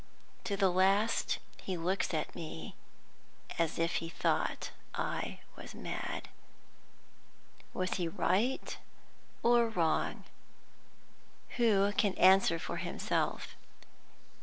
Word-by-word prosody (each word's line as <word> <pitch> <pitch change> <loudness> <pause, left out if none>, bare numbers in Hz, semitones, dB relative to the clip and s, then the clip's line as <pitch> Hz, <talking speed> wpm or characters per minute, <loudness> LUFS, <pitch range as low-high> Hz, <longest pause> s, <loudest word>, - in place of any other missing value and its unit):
To 200 - -1
the 195 -2 +4
last 195 +5 +3 0.2
he 185 -2 -3
looks 185 +3 0
at 155 -3 -2
me 155 - -7 0.9
as 165 -2 +1
if 165 +1 +1
he 165 - -3
thought - - 0 0.2
I - - -3
was - - -10
mad. - - -4 1.4
Was 185 0 -1
he 175 -2 0
right 200 +9 0 0.6
or 235 -1 +5
wrong? 170 -7 0 1.3
Who 205 -4 +4
can 205 -1 +1
answer 190 -2 +6
for - - -4
himself? - - -2
185 Hz, 100 wpm, -33 LUFS, 165-205 Hz, 1.4 s, answer